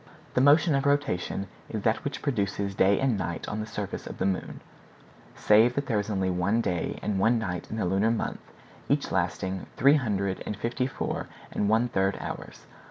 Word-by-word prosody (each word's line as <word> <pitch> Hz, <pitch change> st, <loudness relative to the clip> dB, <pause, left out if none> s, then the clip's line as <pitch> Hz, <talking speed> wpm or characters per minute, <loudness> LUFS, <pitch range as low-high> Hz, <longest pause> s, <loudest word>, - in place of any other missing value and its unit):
The 125 Hz, -, +3 dB
motion 150 Hz, +4 st, +5 dB
of 140 Hz, 0 st, +1 dB
rotation 140 Hz, -9 st, 0 dB, 0.2 s
is 110 Hz, -2 st, -4 dB
that 110 Hz, -1 st, +1 dB
which 145 Hz, -1 st, -4 dB
produces 100 Hz, -6 st, -1 dB
day 95 Hz, +1 st, +3 dB
and 130 Hz, -6 st, +1 dB
night 85 Hz, -2 st, -3 dB
on 105 Hz, -, -3 dB
the 110 Hz, -, -4 dB
surface 105 Hz, -3 st, -5 dB
of -, -, -7 dB
the -, -, -1 dB
moon; 95 Hz, -1 st, -2 dB, 0.7 s
save 110 Hz, +4 st, +4 dB
that 140 Hz, -, -1 dB
there 115 Hz, -5 st, +1 dB
is 100 Hz, -, -3 dB
only 95 Hz, -3 st, 0 dB
one 90 Hz, +5 st, +1 dB
day 90 Hz, -7 st, -1 dB
and 100 Hz, -2 st, 0 dB
one 115 Hz, +4 st, +4 dB
night 90 Hz, -6 st, -4 dB
in 110 Hz, -, -4 dB
the 110 Hz, -, 0 dB
lunar 95 Hz, +5 st, +2 dB
month, 115 Hz, -, -1 dB, 0.5 s
each -, -, +1 dB
lasting 95 Hz, 0 st, -1 dB
three 140 Hz, +3 st, +6 dB
hundred 100 Hz, -7 st, -1 dB
and 105 Hz, -, -4 dB
fifty 120 Hz, +4 st, -1 dB
four 135 Hz, -, -3 dB, 0.2 s
and 105 Hz, -, 0 dB
one 115 Hz, +3 st, +3 dB
third 95 Hz, -3 st, 0 dB
hours. -, -, -7 dB
105 Hz, 195 wpm, -27 LUFS, 95-125 Hz, 0.7 s, three